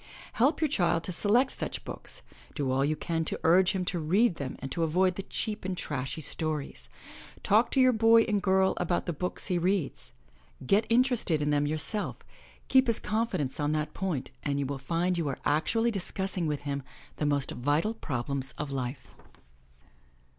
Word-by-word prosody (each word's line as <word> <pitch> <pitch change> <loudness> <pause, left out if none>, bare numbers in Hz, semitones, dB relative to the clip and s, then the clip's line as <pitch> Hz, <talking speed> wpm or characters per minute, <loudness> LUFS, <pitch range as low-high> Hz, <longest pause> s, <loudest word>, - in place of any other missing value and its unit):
Help 275 +8 +2
your 310 - +4
child 175 - +1
to - - -4
select 225 +9 +3
such - - -4
books, - - -6 0.3
do 140 -3 -1
all 135 +1 +2
you 150 +2 +1
can 165 +1 -2
to - - -3
urge 180 +4 +5
him 185 -2 -2
to 175 -1 -2
read 180 +5 +2
them 135 -2 -4
and 135 0 -7
to 170 - -2
avoid 180 +3 +2
the 195 - -5
cheap 215 +2 -4
and 185 -1 -3
trashy 145 +1 -3
stories. 145 - -3 0.5
Talk 215 +4 +4
to 270 - +1
your 255 -1 +6
boy 225 0 +6
or 210 -2 0
girl 190 -1 +3
about 175 0 0
the 175 - -2
books 180 +4 -4
he 180 -2 0
reads. 180 -4 -1 0.5
Get 200 - +3
interested 235 - +3
in 150 0 0
them 145 0 +2
yourself, 155 +8 +1 0.5
keep 260 0 +4
his 230 - +2
confidence 190 - -2
on 145 +1 +1
that 150 0 -2
point 170 -9 -3
and 140 -1 -1
you 140 - 0
will 135 0 -4
find 170 +5 0
you 160 - -1
are 135 - -2
actually 225 +10 +2
discussing 190 -3 -2
with 150 -1 -2
him 140 -1 -3 0.4
the 150 - 0
most 140 -2 0
vital 145 - 0
problems 135 - -3
of 145 -1 -4
life. 130 -1 -5
170 Hz, 185 wpm, -29 LUFS, 145-205 Hz, 0.5 s, your